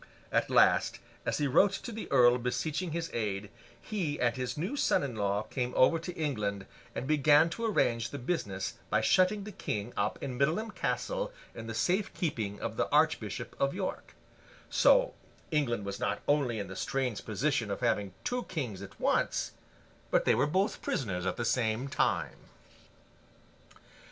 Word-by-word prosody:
At - - +1
last, - - +4 0.3
as - - +1
he 145 - +1
wrote 195 +9 +4
to 235 +4 -5
the 220 0 -6
earl 120 0 +6
beseeching 145 +8 -2
his 165 +1 -3
aid, 105 -2 -2 0.3
he 175 -9 -3
and 120 -2 +2
his 125 0 -3
new 185 - -2
son 285 - +2
in 130 -4 -4
law 100 0 0
came 125 +3 -3
over 165 +6 +5
to 165 +3 -5
England, 105 - -2 0.3
and - - -3
began 150 +2 +5
to 230 +6 -3
arrange 115 - +1
the 145 - -6
business 120 - -3
by - - +2
shutting 190 +3 +3
the 210 - -7
King 105 - -4
up 100 +1 0
in 125 -2 -5
Middleham 170 +11 +1
Castle - - -2 0.2
in 115 - -8
the 115 - -4
safe 185 - +1
keeping 110 - -2
of - - -4
the - - 0
Archbishop - - +1
of 140 +3 +1
York; 190 -1 -4 0.6
so - - +5 0.4
England 120 -9 0
was 100 0 -4
not 100 - -1
only 140 -6 +2
in 100 -2 -3
the 95 - -8
strange 130 -3 -2
position 120 +1 0
of 100 - -3
having 105 -6 0
two 250 0 -2
kings 125 - -4
at 100 - -11
once, - - +1 0.6
but - - +2
they - - +5
were 140 - +2
both 190 +7 0
prisoners 95 -7 -2
at - - 0
the 120 - -1
same 115 +2 +1
time. - - 0
130 Hz, 170 wpm, -31 LUFS, 110-165 Hz, 0.6 s, earl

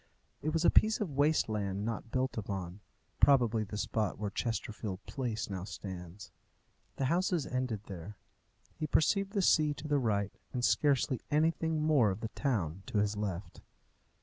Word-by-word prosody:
It 155 - -1
was 165 +1 +1
a - - +7
piece 215 0 +4
of 205 -8 -2
waste 145 +3 +3
land 100 -2 -2
not 115 0 -4
built 130 +2 -1
upon 95 -3 -4 0.4
probably 120 -6 +4
the 105 0 -6
spot 110 -1 -1
where 105 -1 -3
Chesterfield 110 -4 -3
Place 120 -5 -3
now 95 -2 -4
stands. 95 -1 -8 0.6
The 135 - -1
houses 175 +1 +1
ended 125 -5 -2
there. 95 0 -8 0.6
He 155 - -3
perceived 195 +7 +2
the 200 -3 +1
sea 150 -4 +4
to 145 +2 -7
the 145 -1 +2
right, 100 -5 0 0.2
and 125 -1 +1
scarcely 140 -3 +2
anything 160 +1 +1
more 145 -8 +4
of 95 +3 -3
the 110 - -3
town 95 - -1
to - - -2
his 105 0 +1
left. 100 -2 -4
115 Hz, 165 wpm, -32 LUFS, 100-150 Hz, 0.6 s, a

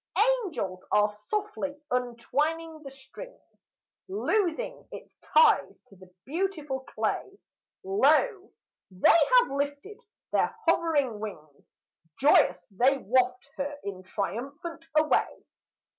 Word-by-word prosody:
Angels 195 - -5
are 210 0 +3
softly 400 - -4 0.2
untwining 295 +7 -2
the 280 - -9
strings, 275 - -12 0.7
Loosing 410 +2 -1
its - - -11
ties 465 -2 +3
to 195 - -17
the 185 -1 -17
beautiful 310 -3 -2
clay; 390 +8 -3 0.5
Lo! 405 +1 +2 0.4
they 185 - +4 0.2
have 485 - -5
lifted 285 +9 -4 0.3
their - - +1
hovering 285 -10 +2
wings: 155 -9 -9 0.5
Joyous 180 -10 +4
they 255 +8 +3
waft 250 +2 0
her 285 +1 -3
in 195 -2 -6
triumph 220 +8 -4 0.4
away! 310 0 +1
280 Hz, 100 wpm, -28 LUFS, 220-350 Hz, 0.7 s, they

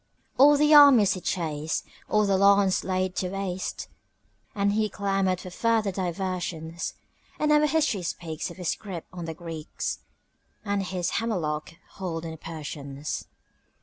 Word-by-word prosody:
All 290 +2 +8
the 300 +1 +4
armies 280 -9 +8
he'd 185 - -8
chased, 155 -3 -2 0.2
all 210 0 +3
the 200 -1 +2
lands 200 0 +4
laid 185 0 -1
to 180 - -1
waste, 190 -1 -4 0.7
And 200 0 +2
he 215 0 +1
clamored 195 -2 0
for 185 - -8
further 225 +1 +1
diversions; 175 -3 -3 0.4
And 300 0 +1
our 300 0 +5
history 300 -10 +1
speaks 165 -1 -4
of 170 - -11
his 180 -3 -1
grip 185 -6 -7
on 175 -2 -6
the 160 -1 -5
Greeks 165 -2 -5 0.7
And 200 -1 0
his 185 -1 -2
hammerlock 160 -11 -2 0.2
hold 170 -4 -4
on 165 - -4
the 160 - -8
Persians. 150 -3 -6
185 Hz, 150 wpm, -26 LUFS, 165-205 Hz, 0.7 s, All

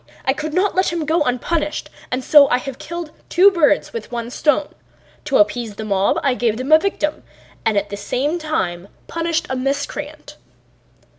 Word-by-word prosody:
I 265 - +3
could 305 +2 -5
not 385 +2 +2
let 375 0 +1
him 335 -2 -2
go 320 +2 +1
unpunished 300 +4 -1 0.2
and 255 +1 -2
so 285 +1 +7
I 245 - +3
have 265 0 -7
killed 340 -2 -6 0.2
two 385 +3 +6
birds 335 +2 +2
with 465 - -6
one 235 0 -4
stone: 295 +2 +1 0.5
to 275 - +2
appease 210 +1 +1
the 220 - -6
mob 200 -1 +1
I 275 - +3
gave 235 -3 0
them 260 +4 -4
a 315 - +8
victim 315 -5 -2 0.5
and 215 -2 +2
at 200 +1 -1
the 200 - -4
same 275 +11 -1
time 190 - -2 0.2
punished 335 0 -1
a 260 - -2
miscreant." 285 +3 -4
290 Hz, 180 wpm, -20 LUFS, 245-320 Hz, 0.5 s, a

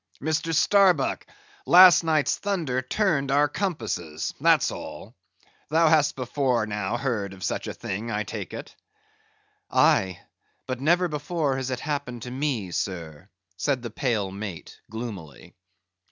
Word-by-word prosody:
Mr. 160 +3 -1
Starbuck, 180 -2 +3 0.4
last 180 -1 +8
night's 155 -3 +2
thunder 165 -11 -1
turned 140 -1 0
our 145 +2 +4
compasses—that's 110 - 0
all. - - -8 0.6
Thou 160 +1 +4
hast 145 -2 +3
before 125 -2 0
now 105 +1 -2
heard 115 -7 -2
of 95 -1 -11
such - - -2
a - - -4
thing, 110 +5 -5
I 105 -1 -1
take - - -6
it." - - -8 0.9
"Aye; 95 -2 +3 0.5
but 130 0 -4
never 175 +5 +3
before 150 -2 -2
has 130 -1 -3
it 130 -1 -3
happened 125 -6 -4
to 125 - -7
me, 130 -8 -2
sir," 85 -1 -5 0.3
said 135 0 -1
the 120 - -5
pale 110 -6 -1
mate, 100 -3 -8
gloomily. 100 - -8
130 Hz, 135 wpm, -25 LUFS, 105-155 Hz, 0.9 s, last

